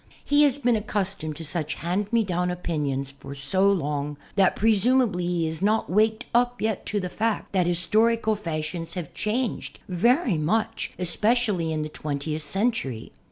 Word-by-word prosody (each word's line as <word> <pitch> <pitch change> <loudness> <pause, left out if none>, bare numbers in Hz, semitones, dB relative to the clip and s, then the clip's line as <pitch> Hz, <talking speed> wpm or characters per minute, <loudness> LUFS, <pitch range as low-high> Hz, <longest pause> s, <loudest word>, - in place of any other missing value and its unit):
He 290 +1 +4
has 280 -2 +2
been 245 -4 +2
accustomed 200 -7 -2
to 165 +2 -8
such 155 -1 -3
hand 190 +5 -2
me 230 -1 +3
down" 180 -2 -1
opinions 145 -6 -2
for 140 +1 -8
so 185 +9 +2
long 150 -4 -2 0.2
that 195 -2 +4
presumably 220 -3 +2
he 175 -2 0
has 160 +1 -4
not 215 0 +1
waked 220 +4 +2
up 245 +1 +3
as - - -4
yet 220 -3 -1
to 205 - 0
the 185 - -3
fact 220 +4 -2
that 185 -3 +2
historical 215 +6 +2
fashions 165 -3 -4
have 175 -5 -5
changed 230 +2 -2
very 235 - +2
much, 220 +8 -1
esj)ecially 205 -1 +2
in 155 -1 -1
the - - -3
twentieth 150 +1 -4
century. 150 - -1
185 Hz, 165 wpm, -25 LUFS, 160-220 Hz, 0.2 s, He